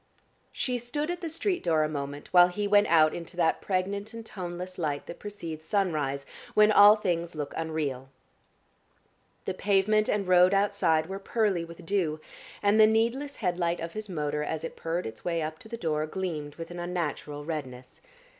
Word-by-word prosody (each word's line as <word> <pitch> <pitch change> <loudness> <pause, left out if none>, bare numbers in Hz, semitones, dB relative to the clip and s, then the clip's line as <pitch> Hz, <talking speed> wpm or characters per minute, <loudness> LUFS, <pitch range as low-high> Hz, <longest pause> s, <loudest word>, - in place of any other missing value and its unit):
She 250 -2 -1
stood 295 +7 -3
at 350 +1 -5
the 335 - -3
street 360 +4 -1
door 160 -3 +3
a - - +1
moment, 145 -1 -5
while 175 -1 +8
he 205 +3 -2
went 205 0 +5
out 155 -2 +5
into 175 +1 -7
that 165 -2 +2
pregnant 200 +3 -2
and 230 -1 -8
toneless 180 -2 -6
light 150 -4 -2
that - - -9
precedes 170 -7 -7
sunrise, 150 -9 0 0.3
when 215 0 +6
all 205 0 +8
things 175 -5 -2
look 150 -2 -4
unreal. 150 -5 -3 1.4
The 190 - -1
pavement 205 +3 +2
and 200 -2 0
road 180 +1 +6
outside 195 -6 +2
were 190 +3 -6
pearly 200 -4 0
with 170 0 -11
dew, 165 -5 0 0.4
and 205 +2 +4
the 215 - +8
needless 235 +6 0
head 180 -4 -2
light 170 0 0
of 165 0 -5
his 215 -1 -6
motor 150 -3 -2
as 155 +1 -3
it 165 - -5
purred 165 +2 -3
its 110 0 -8
way 170 -1 -1
up 155 +1 -5
to 220 - -12
the 230 - -5
door 155 -5 -1
gleamed 155 -5 -4
with 165 0 -8
an 175 - -7
unnatural 150 -4 -3
redness. 130 -6 -6
175 Hz, 185 wpm, -28 LUFS, 155-205 Hz, 1.4 s, while